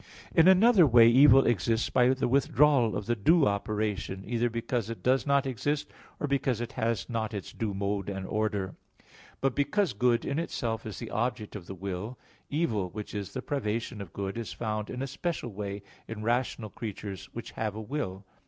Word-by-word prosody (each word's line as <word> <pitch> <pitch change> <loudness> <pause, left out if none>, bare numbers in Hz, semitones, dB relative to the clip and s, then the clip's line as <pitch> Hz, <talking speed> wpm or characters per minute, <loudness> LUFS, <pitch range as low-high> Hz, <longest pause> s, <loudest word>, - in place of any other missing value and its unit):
In 165 +1 +6
another 190 -1 +7
way 115 -2 +7
evil 135 +2 +7
exists 115 0 +1
by 125 -1 +4
the 130 0 +1
withdrawal 135 -2 +3
of 105 - -5
the 120 - +1
due 155 - +4
operation, 100 -2 -2
either 120 +2 0
because 115 0 -2
it 115 - -7
does 130 +3 +2
not 140 -1 +3
exist, 145 +4 -2 0.3
or - - -1
because 135 -4 0
it 120 0 -4
has 115 -2 -1
not 110 -2 -3
its 100 - -6
due 105 -3 -3
mode 100 0 -2
and 95 -1 -4
order. 105 -2 -1 0.7
But 135 -1 +1
because 155 +9 +1
good 120 +2 +2
in 140 +3 -1
itself 115 -9 -3
is 110 - -6
the 115 - -7
object 120 -2 -2
of 90 -5 -8
the 95 - -6
will, 100 +6 -5 0.3
evil, 115 - 0
which 105 +3 -7
is 100 -2 -5
the 130 - -4
privation 115 -4 -2
of 95 -5 -8
good, 100 +3 -4
is 115 - -5
found 110 -2 -3
in 125 +1 -4
a - - -3
special 145 -2 -3
way 100 0 -5 0.2
in 110 -1 -6
rational 120 -2 -1
creatures 100 -5 -6
which - - -7
have 110 -2 -3
a - - -5
will. 105 -6 -4
115 Hz, 190 wpm, -29 LUFS, 105-130 Hz, 0.7 s, another